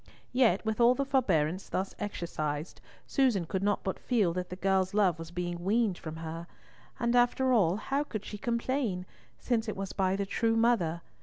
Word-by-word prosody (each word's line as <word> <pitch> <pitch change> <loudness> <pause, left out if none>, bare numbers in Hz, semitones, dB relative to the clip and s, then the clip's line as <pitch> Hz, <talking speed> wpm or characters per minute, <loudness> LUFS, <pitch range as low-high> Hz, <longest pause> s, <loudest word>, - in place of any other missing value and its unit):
Yet, 230 -6 +3
with 220 +1 0
all 240 +2 +6
the 275 - -1
forbearance 185 - +1
thus 190 +1 -2
exercised, 155 -6 -4 0.2
Susan 245 - +2
could 185 +3 -2
not 205 0 +1
but 190 - -3
feel 210 -9 +1
that 180 0 -3
the 180 - -5
girl's 190 0 +1
love 185 -6 +3
was 165 0 -7
being 175 0 -4
weaned 210 -1 +1
from 160 -1 -6
her; 165 +1 -6 0.5
and, 235 0 +1
after 250 +2 +3
all, 190 -7 +4
how 275 +7 -1
could 215 -8 -6
she 210 - -7
complain, 235 -5 -1 0.3
since 230 - -1
it 215 - -4
was 195 0 -4
by 190 -1 +1
the 200 0 -1
true 225 +3 +1
mother? 205 -8 +2
195 Hz, 185 wpm, -30 LUFS, 175-235 Hz, 0.5 s, all